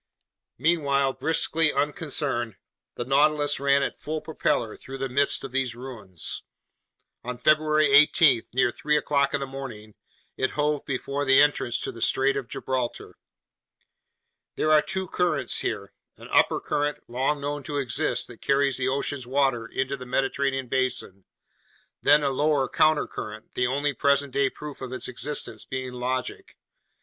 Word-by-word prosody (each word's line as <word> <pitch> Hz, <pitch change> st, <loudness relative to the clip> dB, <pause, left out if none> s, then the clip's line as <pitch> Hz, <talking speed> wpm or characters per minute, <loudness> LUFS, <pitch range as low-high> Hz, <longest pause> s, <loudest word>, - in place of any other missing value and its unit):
Meanwhile, 140 Hz, -5 st, +2 dB
briskly 160 Hz, -1 st, +1 dB
unconcerned, 140 Hz, -, -1 dB, 0.4 s
the 120 Hz, -, -4 dB
Nautilus 145 Hz, +2 st, +2 dB
ran 140 Hz, 0 st, +3 dB
at -, -, -3 dB
full 155 Hz, +1 st, -3 dB
propeller 120 Hz, -8 st, -1 dB
through 135 Hz, +1 st, -9 dB
the 135 Hz, 0 st, -2 dB
midst 140 Hz, +2 st, +1 dB
of 135 Hz, -, -6 dB
these 130 Hz, -2 st, -1 dB
ruins. 115 Hz, -9 st, -5 dB, 0.8 s
On 125 Hz, 0 st, -5 dB
February 155 Hz, +3 st, +3 dB
18, 145 Hz, -2 st, +6 dB
near 125 Hz, -1 st, +2 dB
three 150 Hz, +4 st, +1 dB
o'clock 140 Hz, -1 st, +1 dB
in -, -, 0 dB
the 135 Hz, -, -3 dB
morning, 125 Hz, -6 st, -8 dB, 0.4 s
it 130 Hz, -, 0 dB
hove 150 Hz, -1 st, +1 dB
before 140 Hz, +1 st, -2 dB
the 135 Hz, -1 st, +5 dB
entrance 145 Hz, -5 st, +2 dB
to -, -, -3 dB
the 115 Hz, -, -11 dB
Strait 135 Hz, +1 st, +2 dB
of 135 Hz, -3 st, -3 dB
Gibraltar. 125 Hz, -2 st, -4 dB, 1.4 s
There 155 Hz, -, +1 dB
are 155 Hz, -1 st, +6 dB
two 190 Hz, +5 st, -3 dB
currents 155 Hz, -8 st, 0 dB
here: 100 Hz, -1 st, -4 dB, 0.2 s
an -, -, -12 dB
upper -, -, +4 dB
current, 145 Hz, 0 st, -2 dB
long 130 Hz, +5 st, 0 dB
known 145 Hz, +1 st, -3 dB
to 145 Hz, -, -3 dB
exist, 125 Hz, -2 st, 0 dB
that 120 Hz, -, -13 dB
carries 140 Hz, -1 st, +2 dB
the 130 Hz, -1 st, 0 dB
ocean's 135 Hz, -1 st, -2 dB
waters 130 Hz, -4 st, 0 dB
into 135 Hz, +1 st, -2 dB
the 125 Hz, -, -9 dB
Mediterranean 135 Hz, 0 st, 0 dB
basin; 125 Hz, -7 st, -2 dB, 0.8 s
then 145 Hz, +1 st, +5 dB
a 140 Hz, -, +1 dB
lower 145 Hz, 0 st, +1 dB
countercurrent, 135 Hz, -9 st, 0 dB
the 125 Hz, -, +1 dB
only 145 Hz, +3 st, 0 dB
present 140 Hz, 0 st, +1 dB
day 140 Hz, -1 st, +2 dB
proof 150 Hz, 0 st, -9 dB
of 130 Hz, -1 st, -6 dB
its 130 Hz, -, -3 dB
existence 135 Hz, +4 st, -3 dB
being 130 Hz, -1 st, -5 dB
logic. 125 Hz, +1 st, -4 dB
135 Hz, 155 wpm, -26 LUFS, 125-145 Hz, 1.4 s, 18